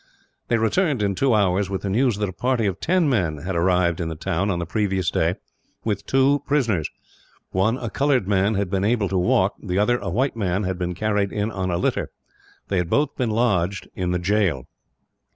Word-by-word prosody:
They 115 Hz, -, +2 dB
returned, 130 Hz, -, +1 dB
in 100 Hz, -1 st, +1 dB
two 125 Hz, +4 st, +2 dB
hours, 100 Hz, -1 st, +2 dB
with 95 Hz, -1 st, -3 dB
the 100 Hz, -, -2 dB
news 120 Hz, 0 st, +2 dB
that 105 Hz, 0 st, -1 dB
a 95 Hz, -, -6 dB
party 125 Hz, +1 st, 0 dB
of 95 Hz, -1 st, -1 dB
ten 180 Hz, -1 st, +2 dB
men 90 Hz, -, +1 dB
had 90 Hz, +5 st, -4 dB
arrived 85 Hz, 0 st, +2 dB
in 85 Hz, -, -2 dB
the 80 Hz, -, -4 dB
town, 80 Hz, +6 st, -1 dB
on 90 Hz, -, 0 dB
the 85 Hz, -, -3 dB
previous 95 Hz, -1 st, 0 dB
day, -, -, +1 dB, 0.5 s
with 105 Hz, -3 st, -2 dB
two 135 Hz, +2 st, +3 dB
prisoners. 115 Hz, -, +1 dB, 0.6 s
One, 110 Hz, +6 st, +1 dB
a 120 Hz, -, -5 dB
coloured 135 Hz, -6 st, +1 dB
man, 100 Hz, +1 st, +2 dB
had 100 Hz, -2 st, -1 dB
been 95 Hz, -1 st, 0 dB
able 105 Hz, -2 st, +1 dB
to 95 Hz, -, 0 dB
walk. 95 Hz, +2 st, +2 dB
The 90 Hz, -3 st, -3 dB
other, 120 Hz, +4 st, +2 dB
a -, -, -4 dB
white 130 Hz, +1 st, 0 dB
man, 100 Hz, -2 st, -1 dB
had 95 Hz, -1 st, -3 dB
been 90 Hz, 0 st, -2 dB
carried 105 Hz, 0 st, 0 dB
in 105 Hz, +1 st, -2 dB
on 95 Hz, -3 st, -3 dB
a 85 Hz, -, 0 dB
litter. -, -, -1 dB, 0.6 s
They 95 Hz, -, -1 dB
had 90 Hz, -2 st, 0 dB
both 145 Hz, +5 st, +1 dB
been 125 Hz, -4 st, -1 dB
lodged 100 Hz, -5 st, 0 dB
in 90 Hz, -1 st, -2 dB
the 90 Hz, -, +1 dB
jail. 90 Hz, -, 0 dB
100 Hz, 215 wpm, -23 LUFS, 90-115 Hz, 0.6 s, two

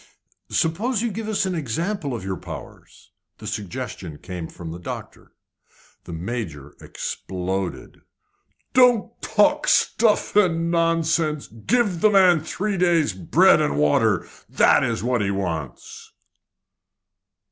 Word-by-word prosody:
"Suppose 215 Hz, +8 st, 0 dB
you 235 Hz, -, -1 dB
give 220 Hz, +2 st, -5 dB
us 205 Hz, -2 st, 0 dB
an 190 Hz, -, -2 dB
example 160 Hz, -, -2 dB
of 115 Hz, -, -6 dB
your 95 Hz, 0 st, -3 dB
powers?" -, -, -11 dB, 0.3 s
The 110 Hz, -, -12 dB
suggestion 105 Hz, -, -6 dB
came 90 Hz, -1 st, -7 dB
from 80 Hz, -1 st, -9 dB
the 85 Hz, -, -7 dB
doctor. 90 Hz, -, -8 dB, 0.7 s
The -, -, -9 dB
Major 80 Hz, -, -6 dB
exploded. 95 Hz, 0 st, -5 dB, 0.7 s
"Don't 245 Hz, -3 st, +3 dB
talk 255 Hz, +8 st, +2 dB
stuff 220 Hz, -3 st, +2 dB
and 170 Hz, -5 st, +2 dB
nonsense! 165 Hz, -2 st, +1 dB
Give 180 Hz, -, -1 dB
the 215 Hz, -, +6 dB
man 185 Hz, -4 st, +5 dB
three 195 Hz, +5 st, -3 dB
days' 170 Hz, -, +2 dB
bread 90 Hz, -2 st, +4 dB
and 70 Hz, -, 0 dB
water. 75 Hz, 0 st, +2 dB, 0.2 s
That -, -, +4 dB
is 95 Hz, -, -2 dB
what 125 Hz, -2 st, +1 dB
he 100 Hz, -, 0 dB
wants." 85 Hz, -8 st, -5 dB
155 Hz, 125 wpm, -23 LUFS, -, 0.7 s, the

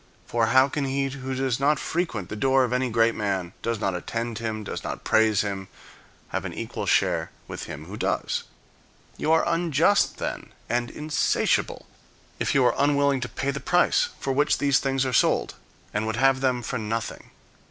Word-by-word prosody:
For 115 Hz, -1 st, +1 dB
how 130 Hz, +2 st, +5 dB
can 140 Hz, 0 st, -2 dB
he 135 Hz, 0 st, 0 dB
who 135 Hz, -1 st, -5 dB
does 130 Hz, -2 st, 0 dB
not 145 Hz, +2 st, +3 dB
frequent 150 Hz, -, -2 dB
the -, -, -4 dB
door 135 Hz, +4 st, +3 dB
of 125 Hz, -1 st, -1 dB
any 125 Hz, 0 st, +1 dB
[great] 115 Hz, 0 st, +3 dB
man, 95 Hz, -4 st, -2 dB
does 115 Hz, -1 st, -2 dB
not 95 Hz, -3 st, 0 dB
attend 115 Hz, +5 st, -3 dB
him, 110 Hz, -2 st, -3 dB
does -, -, -5 dB
not -, -, -5 dB
praise 110 Hz, -2 st, +3 dB
him, 100 Hz, -2 st, -4 dB, 0.6 s
have -, -, -2 dB
an -, -, -5 dB
equal -, -, -5 dB
share -, -, +2 dB, 0.2 s
with -, -, -6 dB
him 75 Hz, -, -8 dB
who 95 Hz, +5 st, -8 dB
does? -, -, -1 dB, 0.7 s
You 155 Hz, -, 0 dB
are 160 Hz, -, +4 dB
unjust, 170 Hz, +2 st, +2 dB
then, -, -, -5 dB
and 120 Hz, +1 st, -1 dB
insatiable, 150 Hz, 0 st, 0 dB, 0.5 s
if -, -, 0 dB
you 135 Hz, -2 st, +5 dB
are -, -, +4 dB
unwilling 140 Hz, -1 st, +3 dB
to 125 Hz, 0 st, -4 dB
pay 140 Hz, +1 st, -2 dB
the 140 Hz, -, -4 dB
price 180 Hz, -, +2 dB
for 135 Hz, -, -1 dB
which 145 Hz, +2 st, +2 dB
these 140 Hz, -2 st, +3 dB
things 135 Hz, -1 st, 0 dB
are 130 Hz, -, -2 dB
sold, -, -, +2 dB, 0.4 s
and 105 Hz, +1 st, -1 dB
would 110 Hz, -, -1 dB
have 135 Hz, +2 st, +3 dB
them 125 Hz, -2 st, +1 dB
for 125 Hz, +1 st, -3 dB
nothing. 110 Hz, +1 st, -4 dB
130 Hz, 190 wpm, -25 LUFS, 110-140 Hz, 0.7 s, how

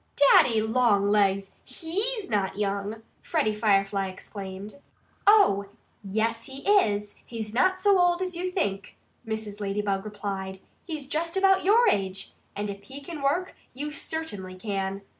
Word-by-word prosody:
"Daddy 225 Hz, -3 st, +5 dB
Longlegs! 205 Hz, -4 st, +2 dB
HE'S 395 Hz, -, -2 dB
not 200 Hz, -3 st, -1 dB
young!" 205 Hz, +2 st, -2 dB, 0.2 s
Freddie 215 Hz, -, 0 dB
Firefly 195 Hz, -2 st, +1 dB
exclaimed. 195 Hz, +5 st, -8 dB, 0.5 s
"Oh! 300 Hz, -, +5 dB, 0.4 s
yes, 225 Hz, +3 st, -1 dB
he 270 Hz, +3 st, -9 dB
is! 210 Hz, -, +2 dB
He's 220 Hz, -2 st, -6 dB
not 370 Hz, +9 st, +3 dB
so 395 Hz, 0 st, +4 dB
old 350 Hz, 0 st, +3 dB
as 365 Hz, -1 st, -3 dB
you 365 Hz, +2 st, -2 dB
think," 200 Hz, -, -3 dB, 0.3 s
Mrs. 220 Hz, -2 st, -5 dB
Ladybug 200 Hz, -1 st, -1 dB
replied. 195 Hz, -2 st, -5 dB, 0.3 s
"He's 310 Hz, -5 st, -5 dB
just 330 Hz, +5 st, -2 dB
about 385 Hz, 0 st, +4 dB
your 455 Hz, +5 st, +5 dB
age. 195 Hz, -, 0 dB, 0.2 s
And 205 Hz, +1 st, -3 dB
if 200 Hz, 0 st, -9 dB
he 270 Hz, +5 st, -9 dB
can 300 Hz, +1 st, -8 dB
work, 330 Hz, +7 st, 0 dB, 0.2 s
you 295 Hz, +3 st, -4 dB
certainly 245 Hz, -12 st, -5 dB
can." 195 Hz, 0 st, -3 dB
215 Hz, 140 wpm, -26 LUFS, 200-320 Hz, 0.5 s, Daddy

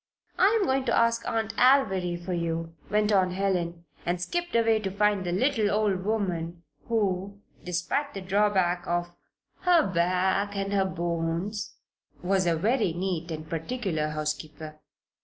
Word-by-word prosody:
"I'm 415 Hz, +3 st, +4 dB
going 265 Hz, 0 st, +1 dB
to 235 Hz, -, +2 dB
ask 230 Hz, 0 st, +2 dB
Aunt 225 Hz, -1 st, -1 dB
Alviry 190 Hz, -10 st, +4 dB
for 185 Hz, -, -2 dB
you," 165 Hz, -1 st, -2 dB, 0.2 s
went 210 Hz, +1 st, +2 dB
on 190 Hz, -3 st, +4 dB
Helen, 175 Hz, -3 st, -1 dB, 0.2 s
and 175 Hz, +1 st, -1 dB
skipped 345 Hz, -, -3 dB
away 225 Hz, -1 st, +4 dB
to 200 Hz, -2 st, -3 dB
find 205 Hz, 0 st, +1 dB
the 175 Hz, -, -2 dB
little 220 Hz, +2 st, +2 dB
old 205 Hz, -3 st, +1 dB
woman 175 Hz, -5 st, -2 dB, 0.2 s
who, 200 Hz, -3 st, -1 dB, 0.2 s
despite 180 Hz, +11 st, -2 dB
the 195 Hz, -, -4 dB
drawback 185 Hz, -2 st, +1 dB
of 175 Hz, 0 st, -2 dB, 0.4 s
"her 350 Hz, -4 st, +4 dB
back 185 Hz, +3 st, +1 dB
and 195 Hz, 0 st, -2 dB
her 195 Hz, -1 st, +3 dB
bones" 170 Hz, +3 st, -2 dB, 0.5 s
was 185 Hz, 0 st, +2 dB
a 170 Hz, -, +3 dB
very 215 Hz, +1 st, +1 dB
neat 175 Hz, -1 st, -2 dB
and 155 Hz, -1 st, -5 dB
particular 165 Hz, -1 st, -2 dB
housekeeper. 155 Hz, 0 st, -5 dB
190 Hz, 145 wpm, -27 LUFS, 170-215 Hz, 0.5 s, I'm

